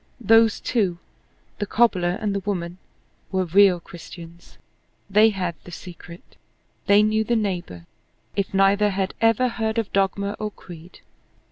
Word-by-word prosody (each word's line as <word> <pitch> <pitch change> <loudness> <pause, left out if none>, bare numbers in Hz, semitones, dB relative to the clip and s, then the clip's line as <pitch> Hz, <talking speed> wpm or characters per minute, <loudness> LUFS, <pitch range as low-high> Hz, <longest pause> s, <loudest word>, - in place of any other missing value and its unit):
Those 225 -1 +4
two, 195 -8 -1 0.6
the 205 - -2
cobbler 185 -6 +2
and 210 -2 -2
the 200 - -1
woman, 180 -3 -4 0.5
were 190 -1 0
real 185 +1 +4
Christians. 170 0 -13 0.5
They 215 +3 +6
had 185 -4 -3
the - - -12
secret. 175 -1 -12 0.5
They 205 +1 +6
knew 215 +1 +1
the 235 +2 0
neighbor, 175 - -3 0.5
if 200 -1 -2
neither 195 +2 +3
had 190 -1 -2
ever 225 +2 +3
heard 225 -2 -3
of 225 -3 -2
dogma 200 +1 0
or 215 - -3
creed. 175 -3 -14
195 Hz, 140 wpm, -23 LUFS, 180-215 Hz, 0.6 s, They